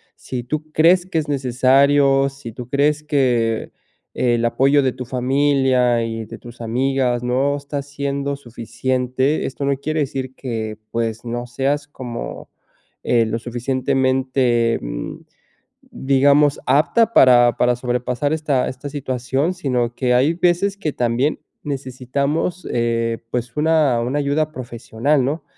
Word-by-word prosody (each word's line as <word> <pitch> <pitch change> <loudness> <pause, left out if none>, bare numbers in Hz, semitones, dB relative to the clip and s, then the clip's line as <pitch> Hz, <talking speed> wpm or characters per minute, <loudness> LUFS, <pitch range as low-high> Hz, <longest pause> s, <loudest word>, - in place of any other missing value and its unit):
si 125 -2 -6
tú 155 +4 -4
crees 175 +3 +4
que 170 - -3
es 155 - -4
necesario, 135 +1 +3
si 135 -4 -10
tú 120 +1 -8
crees 145 +2 +1
que 125 -7 0 0.4
el 120 -1 +1
apoyo 135 +4 +3
de 130 - +2
tu 125 -1 -7
familia 130 -1 +2
y 115 -1 -4
de - - -9
tus 120 0 -13
amigas 125 +1 0
no 135 +3 +1
está 140 0 -5
siendo 140 0 -3
suficiente, 125 +3 -2
esto 135 - -5
no 140 -1 +1
quiere 155 +3 -2
decir 130 -2 -4
que, 110 -4 -4
pues, 115 0 -2
no 120 +1 -4
seas 140 +4 -1
como, 125 -4 -7 0.5
eh, 115 -2 +3
lo 110 +1 -2
suficientemente, 130 -1 0
mm, - - -5 0.7
digamos, 140 +2 +2
apta 190 - +3
para 120 -2 +6
para 125 0 +3
sobrepasar 125 +3 -1
esta 150 -5 0
esta 130 +3 -7
situación, 135 +2 -1
sino 125 -8 -1
que 125 -1 +1
hay 135 +6 +3
veces 180 +3 +1
que 155 -7 -2
también 125 +5 0 0.3
necesitamos, 140 +5 -2
eh, 115 -1 0
pues 120 -1 -3
una 150 -6 +3
una 125 +5 -1
ayuda 150 +2 0
profesional, 125 +2 -1
¿no? 150 +5 -2
130 Hz, 135 wpm, -20 LUFS, 120-145 Hz, 0.7 s, para